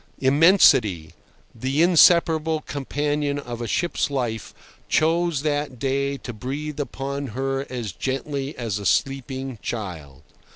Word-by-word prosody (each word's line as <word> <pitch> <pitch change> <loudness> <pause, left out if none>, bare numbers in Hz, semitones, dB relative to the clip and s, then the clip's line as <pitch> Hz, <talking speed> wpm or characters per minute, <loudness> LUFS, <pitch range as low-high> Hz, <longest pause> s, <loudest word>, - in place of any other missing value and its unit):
Immensity, 130 - +4 0.4
the 135 +7 0
inseparable 165 -2 +4
companion 145 +1 -2
of 120 -4 -6
a 120 - -3
ship's 170 - 0
life, 120 -6 -3 0.4
chose 165 -2 +1
that 145 -3 -1
day 140 +2 -1
to 120 - -8
breathe 140 +7 -5
upon 140 0 -4
her 135 0 -2
as 120 -5 -4
gently 135 - -4
as 115 -4 -3
a 100 - -7
sleeping 135 -2 -1
child. 85 - -6
135 Hz, 120 wpm, -23 LUFS, 120-150 Hz, 0.4 s, Immensity